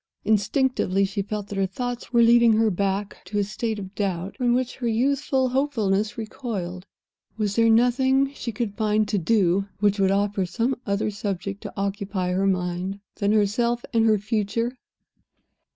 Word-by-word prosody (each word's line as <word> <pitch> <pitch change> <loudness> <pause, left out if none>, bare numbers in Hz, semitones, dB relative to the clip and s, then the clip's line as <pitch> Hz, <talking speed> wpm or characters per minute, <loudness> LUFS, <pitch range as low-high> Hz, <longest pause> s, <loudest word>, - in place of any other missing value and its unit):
Instinctively, 210 -2 +2
she 195 +1 -2
felt 205 0 -5
that 200 - -3
her 195 - +2
thoughts 245 +6 -5
were 235 -1 +5
leading 235 0 +6
her 220 0 +3
back 200 +2 -1
again - - -17
to 205 +3 -4
a 205 - +3
state 215 +2 -3
of 195 -1 -7
doubt 190 -2 -2
from 245 -2 +1
which 255 -1 -2
her 245 - -2
youthful 265 +3 +1
hopefulness 220 -7 0
recoiled. 205 -5 -5 0.5
Was 205 -2 -1
there 230 0 +4
nothing 260 +4 +3
she 240 - -5
could 225 -2 -3
find 215 0 +1
to 205 - +1
do 195 0 +2
which 205 0 +2
would 195 -1 +3
offer 200 0 +1
some 230 +9 0
other 200 +1 0
subject 200 -1 -4
to - - -7
occupy 195 -2 -2
her 190 +2 +1
mind 180 +1 -1 0.2
than 200 0 +1
herself 235 +3 +1
and 225 -1 +3
her 215 -1 +4
future? 220 +3 -1
210 Hz, 170 wpm, -24 LUFS, 195-235 Hz, 0.5 s, leading